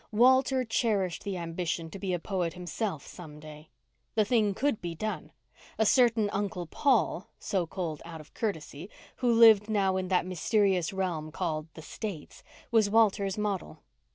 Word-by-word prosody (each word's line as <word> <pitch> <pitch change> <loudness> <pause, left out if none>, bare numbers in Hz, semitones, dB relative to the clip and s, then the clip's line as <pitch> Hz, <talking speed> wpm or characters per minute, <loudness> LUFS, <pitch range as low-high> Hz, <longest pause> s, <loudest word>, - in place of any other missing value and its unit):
Walter 260 +3 +4
cherished 210 -6 0
the 200 -2 -3
ambition 165 -1 -3
to 195 - -8
be 190 -1 -2
a 180 - +1
poet 175 -1 -2
himself 180 -2 -4
some 155 -4 -11
day. 155 0 -12 0.5
The 215 -1 +3
thing 210 -3 +2
could 280 -2 0
be 170 -1 -4
done. 215 +5 -4 0.5
A 220 - +2
certain 230 -2 +4
Uncle 195 -3 -2
Paul—so 195 - 0
called 160 -4 -4
out 165 -1 -9
of 150 - -15
courtesy—who 200 - -4
lived 225 -2 +7
now 195 -3 +1
in 185 -1 -2
that 180 -1 +1
mysterious 185 0 +1
realm 175 -5 -3
called 155 -3 -3
"the 160 - -10
States," 190 -4 -7 0.3
was 220 -3 +4
Walter's 200 -3 +2
model. 205 -4 -3
190 Hz, 155 wpm, -29 LUFS, 170-215 Hz, 0.5 s, lived